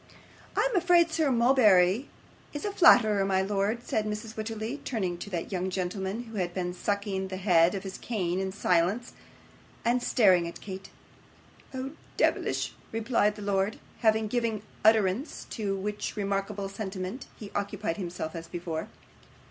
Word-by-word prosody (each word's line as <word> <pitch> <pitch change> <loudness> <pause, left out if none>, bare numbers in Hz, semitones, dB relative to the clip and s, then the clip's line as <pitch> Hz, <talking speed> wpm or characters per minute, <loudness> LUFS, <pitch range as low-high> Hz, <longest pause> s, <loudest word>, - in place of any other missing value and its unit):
'I - - +3
am - - -2
afraid 350 -2 +4
Sir 315 -2 +2
Mulberry 235 -4 +4 0.4
is 290 - -4
a 410 - -1
flatterer, 220 - +6
my 190 -1 +2
lord,' 205 +4 0
said 215 -1 0
Mrs. 215 +1 -4
Wititterly, 220 +4 -4
turning 190 -8 -2
to 200 - -6
that 175 -1 -4
young 185 0 -1
gentleman, 190 +4 -3
who 225 -2 -9
had 175 -2 -2
been 180 -1 -2
sucking 200 0 -2
the 190 0 -5
head 180 -2 +4
of 195 - -4
his 195 -1 -7
cane 185 -6 -1
in 190 0 -2
silence, 190 +5 +1 0.7
and 245 +1 +2
staring 185 -9 +4
at 170 - -8
Kate. 190 -1 -8 0.8
'Oh, 265 0 -4 0.3
deyvlish!' - - +1 0.2
replied 225 -2 +1
Verisopht. 200 0 0 0.2
Having 220 -1 +2
given 230 -3 -1 0.2
utterance 220 - +2
to 205 -4 -2
which 210 +2 -3
remarkable 200 0 -2
sentiment, 195 +2 -5
he 205 -2 -9
occupied 205 -3 -2
himself 175 -4 -5
as 165 0 -6
before. 170 -2 -4
205 Hz, 150 wpm, -28 LUFS, 190-225 Hz, 0.8 s, flatterer